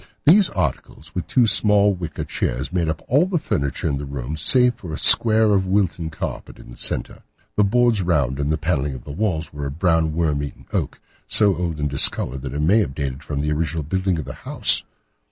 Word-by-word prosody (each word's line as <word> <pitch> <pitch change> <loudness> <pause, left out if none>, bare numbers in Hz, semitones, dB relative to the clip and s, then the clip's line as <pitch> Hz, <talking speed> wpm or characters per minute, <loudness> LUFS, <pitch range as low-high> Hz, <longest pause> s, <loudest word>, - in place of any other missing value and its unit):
These 185 +6 +6
articles, 75 0 -4
with 90 - -4
two 125 -3 +3
small 105 -2 +3
wicker 85 -4 -6
work - - -11
chairs, 65 +8 -3
made 85 -3 0
up 80 0 -4
all 145 +8 +3
the 185 -2 -1
furniture 70 - -2
in 70 -3 -1
the 70 - -6
room 70 +1 -5
save 125 - +4
for 90 -8 -10
a - - -4
square 110 -2 +6
of 95 -1 +1
Wilton 95 -4 -1
carpet 80 - -7
in - - -14
the - - -11
centre. - - -3 0.3
The 105 - +3
boards 120 0 +2
round 70 -7 0
and 70 +1 -1
the 80 - 0
panelling 75 -4 -2
of 65 - -10
the 75 - -9
walls 85 -2 -3
were 70 -1 -5
of 70 +2 -8
brown, 80 -3 +1
worm 75 -4 0
eaten 70 - -8
oak, - - -3 0.3
so 100 -3 +4
old 85 -3 -4
and 75 - -1
discoloured 65 -2 +2
that 65 0 -6
it 75 - -2
may 95 +9 +3
have 70 -11 -2
dated 70 -1 -4
from 75 -3 -4
the 75 0 -2
original 80 +1 -2
building 95 +3 -1
of 80 - -5
the - - -7
house. - - +2
80 Hz, 225 wpm, -21 LUFS, 75-100 Hz, 0.3 s, These